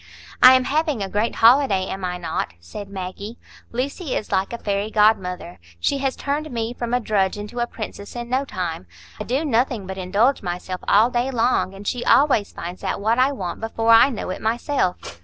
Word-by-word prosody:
"I 255 - +10
am 255 - +3
having 300 - 0
a - - -3
great 210 +4 -1
holiday, 230 -5 +4
am 190 0 -6
I 180 0 -2
not?" 165 - -4
said 195 - -9
Maggie. 200 +4 -7 0.3
"Lucy 270 +5 -3
is - - -4
like 190 +1 0
a 235 - -4
fairy 200 -1 -2
godmother; 190 -5 +1 0.2
she 275 - 0
has 270 -1 -1
turned 295 +2 -3
me 230 -2 -3
from 240 -1 -5
a 245 - +2
drudge 205 -4 0
into 210 +4 -6
a 240 - 0
princess 205 -2 -8
in 240 0 -5
no 260 +3 0
time. 175 - -5 0.3
I - - -4
do 270 +6 -1
nothing 240 -5 0
but 190 +1 -6
indulge 205 +9 +1
myself 180 0 -5
all 220 +5 +5
day 245 +1 0
long, 235 -6 +1
and 200 +1 -9
she 245 -1 -1
always 260 -7 +3
finds 175 +2 -8
out - - -2
what 225 +4 +1
I 260 +2 +4
want 185 -10 -5
before 225 0 0
I 230 +4 +7
know 225 -7 -4
it - - -6
myself." 230 - 0
225 Hz, 205 wpm, -22 LUFS, 190-250 Hz, 0.3 s, I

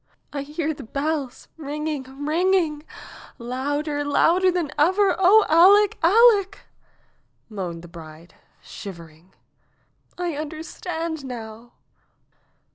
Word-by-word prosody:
^'I 280 -1 -3
hear 310 +2 -3
the 285 - -11
bells 275 +2 -4
ringing, 300 -2 -4 0.2
ringing 330 -1 +1 0.3
— - - -17
louder, 290 +3 -2
louder 345 +6 +3
than 345 -5 -2
ever! 375 +5 +3
Oh, 405 +3 +6
Aleck! 390 +5 +5
Aleck 410 +2 +4 0.5
!" - - -44
moaned 170 -3 -5
the - - -11
bride, 165 0 -13 0.3
shiv 195 -4 -9
ering. 165 0 -16 0.9
''I 350 -3 -3
understand 320 +1 -5
now. 235 -2 -9
300 Hz, 110 wpm, -23 LUFS, 255-355 Hz, 0.9 s, Oh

